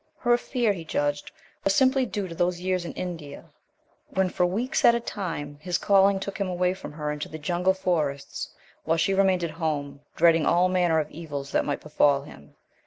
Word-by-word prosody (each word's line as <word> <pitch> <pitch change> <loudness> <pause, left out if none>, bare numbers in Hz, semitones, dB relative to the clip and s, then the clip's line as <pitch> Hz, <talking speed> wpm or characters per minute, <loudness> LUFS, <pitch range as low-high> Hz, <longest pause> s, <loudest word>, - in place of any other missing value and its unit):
Her 240 -1 +3
fear, 240 -3 0
he 170 -4 -7
judged, 145 -2 -1 0.3
was 195 0 +2
simply 265 -1 +3
due 205 -3 -3
to 170 - -7
those 175 +1 0
years 185 -1 -1
in - - -6
India, 165 -6 -7 0.6
when 190 -1 +1
for 180 0 +1
weeks 225 +8 -1
at 235 - +7
a - - +1
time 165 -10 -5
his 175 +1 -1
calling 195 0 +4
took 200 +1 -6
him 200 - 0
away 180 0 +1
from 190 - -9
her 150 -1 -3
into 150 0 -5
the 155 - -7
jungle 175 +4 +1
forests, 150 -7 -2 0.3
while 165 - +1
she 165 +4 +2
remained 190 -2 +3
at 170 - -2
home 145 -3 -3
dreading 165 -1 +4
all 180 +2 +4
manner 175 -3 +2
of 150 -1 -3
evils 145 -4 -6
that - - +1
might 145 - -2
befall 145 -2 +2
him. 70 - -14
175 Hz, 200 wpm, -26 LUFS, 150-190 Hz, 0.6 s, at